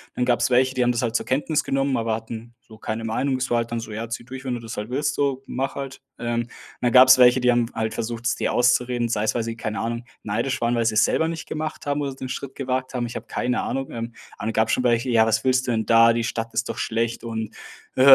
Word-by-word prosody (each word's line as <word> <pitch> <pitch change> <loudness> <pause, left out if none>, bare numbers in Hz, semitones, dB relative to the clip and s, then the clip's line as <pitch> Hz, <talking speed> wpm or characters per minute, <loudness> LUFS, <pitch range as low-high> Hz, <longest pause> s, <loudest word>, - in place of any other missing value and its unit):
Dann 125 - +1
gab's 120 -1 +2
welche, 130 +1 +3
die 125 - +2
haben 120 - +3
das 120 - -1
halt 115 -2 -1
zur - - 0
Kenntnis 150 +3 0
genommen, 135 0 0
aber 115 -1 0
hatten 115 +1 -6
so 110 -1 -16
keine 110 +1 -4
Meinung. 130 +4 0
Es 130 +1 -2
war 120 - +2
halt 115 0 -2
dann 115 - -1
so: 115 -1 -7
„Ja, 115 +1 -5
zieh 115 0 -5
durch, 130 +1 -8
wenn 125 -2 -2
du - - -5
das 115 -1 -7
halt 105 +2 -5
willst, 140 +4 0
so, 140 -2 0
mach 135 +1 -3
halt.“ 135 -1 -6 0.2
Ähm, 120 0 -2 0.3
dann 120 - +2
gab 130 +1 +8
es 130 - +9
welche, 125 0 +6
die 125 0 +4
haben 120 -1 +2
halt 110 0 -2
versucht, 115 0 -4
es - - +2
dir - - -1
auszureden, 120 0 +2
sei 110 -2 -1
es, 110 - +1
weil 115 - -1
sie, 115 0 -4
keine 110 -1 -4
Ahnung, 115 +1 -3 0.2
neidisch 115 +5 -1
waren, 120 +1 +1
weil 115 - +1
sie 110 -1 +1
es 110 - +6
selber 160 - +1
nicht 165 -1 -5
gemacht 155 0 -4
haben 145 0 0
oder 140 -2 -2
den 130 -1 -6
Schritt 135 +1 -5
gewagt 130 -1 -2
haben. 120 -1 -1
Ich 115 - -7
habe - - -6
keine 125 0 -1
Ahnung. 135 0 -3
Ähm. 115 0 -5 0.3
Aber - - -4
dann 115 - -1
gab 110 0 +2
es - - 0
schon 125 - +1
welche: 120 +1 +2
„Ja, 115 -2 +5
was 110 +1 +1
willst 130 0 +2
du - - +1
denn 110 -1 0
da? 115 +1 +6
Die 115 0 0
Stadt 115 0 -3
ist 120 - 0
doch - - -5
schlecht 115 +1 -1
und, 110 -2 -4 0.4
hä, - - +2
120 Hz, 290 wpm, -23 LUFS, 115-130 Hz, 0.4 s, es